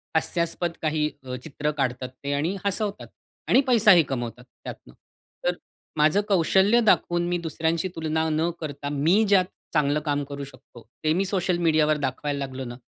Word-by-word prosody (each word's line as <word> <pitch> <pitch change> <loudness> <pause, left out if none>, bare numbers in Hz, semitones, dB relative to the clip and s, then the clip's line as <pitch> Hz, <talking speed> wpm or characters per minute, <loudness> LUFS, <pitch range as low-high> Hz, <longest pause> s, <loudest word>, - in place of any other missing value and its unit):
हास्यास्पद 170 +1 0
काही 155 -1 0
अ, 125 -1 -5
चित्र 150 0 -3
काढतात 130 -3 -2
ते 140 0 -1
आणि 160 +7 -1
हसवतात. 200 +1 -2 0.4
आणि 265 - +5
पैसाही 210 -8 +6
कमवतात 120 -2 -4
त्यातनं. 60 - -12 0.5
तर 175 - +1 0.4
माझं 155 +7 +4
कौशल्य 195 +4 +4
दाखवून 175 -5 +2
मी 175 0 0
दुसऱ्यांशी 165 +1 -1
तुलना 160 0 -1
न 160 +2 +1
करता 145 -2 -5
मी 160 +9 +3
ज्यात 195 -2 +4 0.3
चांगलं 150 -1 +2
काम 145 -1 -1
करू 140 0 -7
शकतो, 130 -3 -14 0.2
ते 155 0 +3
मी 190 +4 +1
सोशल 185 -2 0
मीडियावर 155 -2 +2
दाखवायला 140 +1 -3
लागलो 135 -1 -5
ना. 120 0 -7
155 Hz, 160 wpm, -25 LUFS, 140-175 Hz, 0.5 s, पैसाही